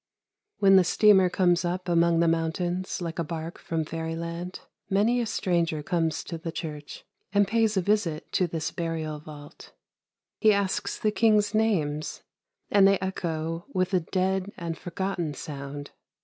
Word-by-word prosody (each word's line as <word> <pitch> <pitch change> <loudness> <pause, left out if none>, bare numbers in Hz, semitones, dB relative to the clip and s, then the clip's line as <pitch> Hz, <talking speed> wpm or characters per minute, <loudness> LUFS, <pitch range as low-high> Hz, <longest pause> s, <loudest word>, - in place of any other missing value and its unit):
" 415 0 -61
When 195 -1 +7
the 185 - +6
steamer 190 0 +5
comes 175 -1 +2
up 180 +1 -2
among 170 -1 +3
the 170 - +3
mountains 175 +3 -1
like 165 0 -4
a - - +1
bark 165 +1 -6
from 160 -1 -2
fairyland, 170 +3 -5 0.3
many 220 +5 +2
a 235 - -2
stranger 170 -7 0
comes 165 -1 0
to 165 - -6
the 165 0 -5
church 150 -3 -7 0.3
and 205 0 +3
pays 220 -1 +2
a - - +3
visit 190 -6 0
to 180 - +2
this 160 -1 -3
burial 160 -2 -3
vault. 145 -1 -12 0.7
He 215 -1 +5
asks 200 0 -1
the 215 - +1
kings' 210 -1 +3
names, 165 -9 0 0.5
and 200 -1 +6
they 195 0 +4
echo 165 -3 -3
with 185 +1 0
a 185 - +4
dead 190 +3 -1
and 170 -2 -4
forgotten 175 -3 -3
sound. 145 0 -7
175 Hz, 160 wpm, -27 LUFS, 165-195 Hz, 0.7 s, When